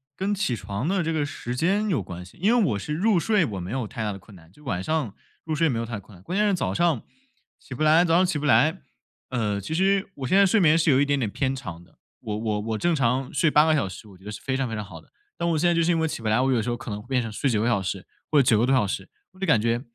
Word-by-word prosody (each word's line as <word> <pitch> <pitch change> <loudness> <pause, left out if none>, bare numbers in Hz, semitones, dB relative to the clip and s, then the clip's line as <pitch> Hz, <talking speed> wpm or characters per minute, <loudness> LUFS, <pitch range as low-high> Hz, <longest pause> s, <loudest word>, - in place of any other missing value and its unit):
跟 195 +5 -1
起 190 - -1
床 100 - -4
的 190 -1 +1
这 165 - -1
个 155 -2 0
时 125 -3 -5
间 200 +9 +1
有 155 - +1
关 90 -1 -8
系。 90 - -17
因 215 +7 +3
为 235 - +4
我 100 - -1
是 150 +10 -4
入 190 +3 +2
睡 210 -1 +2
我 100 -8 -5
没 90 +2 -6
有 125 -3 -2
太 115 -1 -5
大 105 - -1
的 100 - -7
困 100 +1 -16
难， 80 -1 -17
就 150 - -20
晚 90 -10 -2
上 150 -5 -1 0.3
入 160 - -3
睡 165 +1 +2
没 120 - -1
有 115 - -2
太 115 -3 -5
困 100 +1 -16
难， 90 - -17
关 185 - -3
键 210 0 +3
是 200 - +2
早 180 - -1
上 170 -8 +1 0.6
起 130 - -9
不 155 - -2
来 155 +3 +5
早 165 - +2
上 185 +2 +5
起 175 -5 -1
不 150 - -4
来。 150 +7 +3 0.5
呃， 105 -5 -1
其 155 - -5
实 195 +3 +2
我 135 -2 -5
现 190 - +3
在 200 - +7
睡 200 +3 +3
眠 160 -4 +5
是 165 0 +2
有 135 -2 +5
一 145 - +3
点 140 0 +1
点 115 -6 -1
偏 135 +4 -1
长 85 -11 -7
的， - - -25 0.2
我 105 -1 -4
我 110 -1 -1
我 110 0 -3
正 175 +8 +1
常 130 -1 0
睡 150 +3 +3
8 150 +1 +5
个 160 - +3
小 110 -10 0
时 100 +4 -10
我 95 - -15
觉 95 - -20
得 105 - -6
是 105 - -8
非 130 - -2
常 135 -2 -1
非 115 - -4
常 105 - -4
好 90 -5 -11
的， - - -26 0.3
但 170 - -1
我 165 - +1
现 175 +3 +2
在 175 - +3
就 170 - +2
是 175 - +2
因 165 - +1
为 160 - +1
起 150 - -5
不 110 - -4
来， 110 +2 +3
我 135 - +2
有 120 -3 +2
时 115 - -3
候 120 - 0
可 - - -9
能 105 - -5
会 110 - -17
变 130 -1 +1
成 115 -2 -5
睡 135 +6 -1
9 110 -3 +1
个 115 - +1
小 100 -5 +2
时， 95 0 -4 0.2
或 155 - +2
者 140 - +5
9 115 -3 +3
个 115 - +3
多 135 - +2
小 125 -5 +3
时。 95 0 -5 0.2
我 185 - -20
就 190 - -2
感 115 -8 +4
觉， 115 +1 0
130 Hz, 350 characters per minute, -25 LUFS, 105-165 Hz, 0.6 s, 在